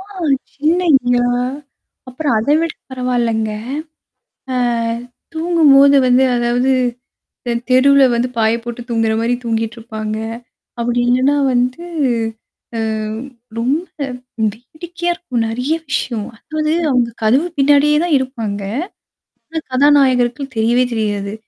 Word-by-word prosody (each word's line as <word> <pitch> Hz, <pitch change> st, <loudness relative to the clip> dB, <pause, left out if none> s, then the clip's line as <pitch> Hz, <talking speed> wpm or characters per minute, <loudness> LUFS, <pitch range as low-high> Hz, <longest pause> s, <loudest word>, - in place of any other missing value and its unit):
அ -, -, -8 dB, 0.5 s
சின்னையா! 285 Hz, -6 st, +2 dB, 0.8 s
அப்புறம் 255 Hz, 0 st, -1 dB
அத 225 Hz, +6 st, -1 dB
விட 330 Hz, -1 st, -1 dB, 0.2 s
பரவால்லங்க. 240 Hz, -4 st, -1 dB, 1.0 s
ஆ -, -, -1 dB, 0.8 s
தூங்கும்போது 305 Hz, -4 st, +5 dB
வந்து 250 Hz, +1 st, +4 dB
அதாவது 245 Hz, +2 st, +1 dB, 0.7 s
இந்த 240 Hz, -, -2 dB, 0.2 s
தெருவுல 275 Hz, +2 st, +5 dB
வந்து 240 Hz, +2 st, 0 dB
பாய 220 Hz, 0 st, +3 dB
போட்டு 240 Hz, 0 st, -6 dB
தூங்குறமாரி 225 Hz, +1 st, +1 dB
தூங்கிட்டுருப்பாங்க. 225 Hz, -1 st, -3 dB, 0.6 s
அப்பிடி 240 Hz, +1 st, 0 dB
இல்லன்னா 260 Hz, +4 st, +3 dB, 0.2 s
வந்து, 250 Hz, +7 st, 0 dB, 0.9 s
அ -, -, -1 dB, 0.8 s
ரொம்ப 285 Hz, +9 st, 0 dB, 0.7 s
வேடிக்கையா 345 Hz, -, -5 dB
இருக்கும். 250 Hz, -10 st, -2 dB
நிறைய 250 Hz, +7 st, -1 dB, 0.2 s
விஷயம். 235 Hz, -6 st, -2 dB
அதாவது 310 Hz, +3 st, -2 dB, 0.2 s
அங்க 245 Hz, -2 st, +2 dB
கதவு 265 Hz, +10 st, +3 dB
பின்னாடியே 290 Hz, +2 st, +4 dB
தான் 345 Hz, -4 st, +2 dB
இருப்பாங்க. 230 Hz, -6 st, -4 dB, 0.9 s
ஆனா 320 Hz, 0 st, -3 dB
கதாநாயகர்கள் 265 Hz, -1 st, +3 dB
தெரியவே 235 Hz, +3 st, +3 dB
தெரியாது. 205 Hz, -2 st, -2 dB
250 Hz, 100 wpm, -17 LUFS, 230-290 Hz, 1.0 s, தூங்கும்போது